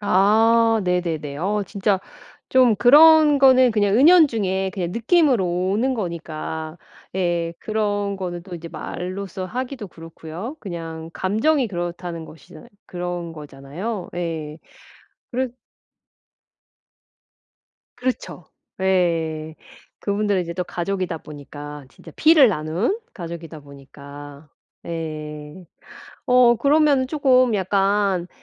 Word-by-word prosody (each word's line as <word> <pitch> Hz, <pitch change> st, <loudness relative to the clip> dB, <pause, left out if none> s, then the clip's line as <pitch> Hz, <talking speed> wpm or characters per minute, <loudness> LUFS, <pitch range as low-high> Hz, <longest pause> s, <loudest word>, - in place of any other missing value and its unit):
아 220 Hz, +3 st, +3 dB
네네네. 165 Hz, -5 st, -2 dB
어 205 Hz, +5 st, -1 dB
진짜 200 Hz, -1 st, 0 dB, 0.5 s
좀 255 Hz, -4 st, +4 dB
그런 300 Hz, +5 st, +7 dB
거는 260 Hz, -2 st, +6 dB
그냥 205 Hz, -1 st, +2 dB
은연중에 230 Hz, -, +4 dB
그냥 180 Hz, -4 st, -4 dB
느낌으로 240 Hz, -, +2 dB, 0.3 s
오는 255 Hz, +6 st, +1 dB
거니까 160 Hz, -4 st, -5 dB, 0.4 s
예 175 Hz, -2 st, -1 dB
그런 205 Hz, -2 st, -2 dB
거는 175 Hz, -2 st, -5 dB
또 185 Hz, -2 st, -8 dB
이제 165 Hz, 0 st, -8 dB
말로써 185 Hz, +2 st, -6 dB
하기도 245 Hz, 0 st, -5 dB
그렇고요. 165 Hz, -, -9 dB
그냥 165 Hz, -3 st, -7 dB
감정이 235 Hz, +8 st, +1 dB
그렇다는 175 Hz, -2 st, -5 dB
것이잖아 155 Hz, 0 st, -15 dB, 0.2 s
그런 175 Hz, -1 st, -5 dB
거잖아요. 155 Hz, +8 st, -7 dB
예. 160 Hz, -3 st, -4 dB, 0.7 s
그래서 255 Hz, -1 st, -2 dB, 2.4 s
그렇죠. 255 Hz, 0 st, -4 dB, 0.4 s
예. 165 Hz, -4 st, 0 dB, 0.4 s
그분들은 200 Hz, -1 st, 0 dB
이제 170 Hz, -1 st, -5 dB
또 180 Hz, -, -2 dB
가족이다 175 Hz, -2 st, -3 dB
보니까 145 Hz, -1 st, -10 dB
진짜 -, -, -15 dB
피를 310 Hz, -6 st, +6 dB
나눈 180 Hz, -, -1 dB
가족이다 165 Hz, -3 st, -8 dB
보니까. 140 Hz, +1 st, -13 dB, 0.3 s
네. 155 Hz, 0 st, -7 dB, 0.6 s
어 250 Hz, -1 st, +5 dB
그러면은 280 Hz, 0 st, +3 dB
조금 255 Hz, -5 st, +3 dB
약간 195 Hz, -1 st, +1 dB
185 Hz, 235 characters per minute, -22 LUFS, 165-230 Hz, 2.4 s, 그런